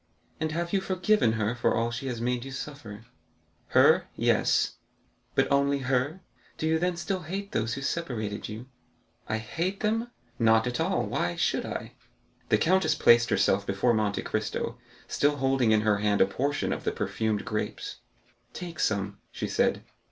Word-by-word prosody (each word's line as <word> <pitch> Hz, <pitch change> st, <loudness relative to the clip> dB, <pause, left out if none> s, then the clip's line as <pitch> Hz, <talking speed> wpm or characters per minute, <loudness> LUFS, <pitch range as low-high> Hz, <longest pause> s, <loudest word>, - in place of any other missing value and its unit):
"And 160 Hz, 0 st, -1 dB
have 170 Hz, +2 st, -2 dB
you 195 Hz, -, +3 dB
forgiven 185 Hz, -, +2 dB
her 110 Hz, 0 st, 0 dB
for 120 Hz, -, +1 dB
all 115 Hz, +1 st, 0 dB
she 125 Hz, +3 st, -4 dB
has 120 Hz, -3 st, -3 dB
made 120 Hz, 0 st, -1 dB
you 135 Hz, -, -7 dB
suffer?" 130 Hz, -6 st, -8 dB, 0.6 s
"Her,—yes." -, -, +3 dB, 0.6 s
"But -, -, +2 dB
only 140 Hz, 0 st, +3 dB
her; 135 Hz, +7 st, 0 dB, 0.4 s
do -, -, -2 dB
you 160 Hz, 0 st, +2 dB
then 180 Hz, +1 st, 0 dB
still 190 Hz, +2 st, -2 dB
hate 195 Hz, +4 st, -5 dB
those 115 Hz, +2 st, -1 dB
who 135 Hz, -, -5 dB
separated 115 Hz, -11 st, -3 dB
you?" 110 Hz, +3 st, -7 dB, 0.6 s
"I 110 Hz, -, +1 dB
hate 170 Hz, -, -3 dB
them? 225 Hz, +2 st, 0 dB, 0.3 s
Not 110 Hz, -1 st, +4 dB
at 125 Hz, -1 st, -2 dB
all; -, -, +1 dB
why -, -, -1 dB
should -, -, 0 dB
I?" -, -, -5 dB, 0.6 s
The -, -, +5 dB
countess 190 Hz, +3 st, +3 dB
placed 115 Hz, 0 st, +5 dB
herself 100 Hz, +1 st, +2 dB
before 100 Hz, +5 st, +2 dB
Monte 105 Hz, -2 st, 0 dB
Cristo, -, -, -3 dB, 0.3 s
still 145 Hz, +1 st, +2 dB
holding 135 Hz, -4 st, +2 dB
in 110 Hz, -1 st, +4 dB
her 105 Hz, -1 st, +2 dB
hand 105 Hz, -1 st, +2 dB
a -, -, +7 dB
portion 140 Hz, +9 st, -1 dB
of -, -, -5 dB
the -, -, 0 dB
perfumed 110 Hz, -2 st, -2 dB
grapes. 105 Hz, -, -4 dB, 0.6 s
"Take 170 Hz, -3 st, -7 dB
some," 100 Hz, -1 st, 0 dB
she -, -, -4 dB
said. -, -, +1 dB
125 Hz, 165 wpm, -28 LUFS, 110-160 Hz, 0.6 s, a